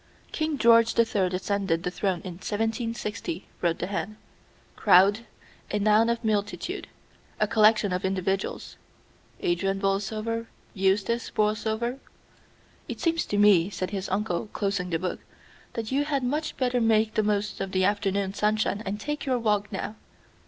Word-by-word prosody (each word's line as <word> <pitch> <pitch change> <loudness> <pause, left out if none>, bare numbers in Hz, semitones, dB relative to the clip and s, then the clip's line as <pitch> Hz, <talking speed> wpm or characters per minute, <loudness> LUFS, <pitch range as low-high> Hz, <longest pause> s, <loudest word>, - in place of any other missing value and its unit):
"King 310 -2 -1
George 230 -2 +5
the 230 - +5
Third 195 -5 0
ascended 190 -2 -1
the 180 - -2
throne 185 -2 -1
in 185 - -6
1760," 225 -4 -3 0.2
wrote 170 -2 +1
the - - -3
hand. 205 +2 -3 0.6
"Crowd, 205 +5 +5 0.4
a 210 - 0
noun 215 +2 +4
of 235 0 -1
multitude; 215 - -2 0.5
a 215 - +4
collection 215 -2 +4
of 180 - -2
individuals 190 0 -2 0.6
Adrian 195 +3 0
Borlsover, 215 +4 -1 0.3
Eustace 200 +4 +1
Borlsover." 220 +4 -1 0.9
"It - - -6
seems 330 -1 +1
to 205 - -1
me," 200 -4 +5
said 185 -2 -4
his 195 -1 -3
uncle, 195 0 -1
closing 195 -3 -1
the 165 - +1
book, 180 +2 -3 0.5
"that 225 0 -4
you 280 +2 +1
had 280 -3 -1
much 295 +5 -2
better 250 -2 +1
make 220 -1 +3
the 215 - +2
most 210 -1 -1
of 195 -1 -3
the 185 0 +2
afternoon 200 -1 0
sunshine 210 0 0
and 205 +1 -4
take 295 +4 -4
your 255 -1 +2
walk 210 -3 0
now." 210 +2 -4
210 Hz, 150 wpm, -26 LUFS, 195-230 Hz, 0.9 s, George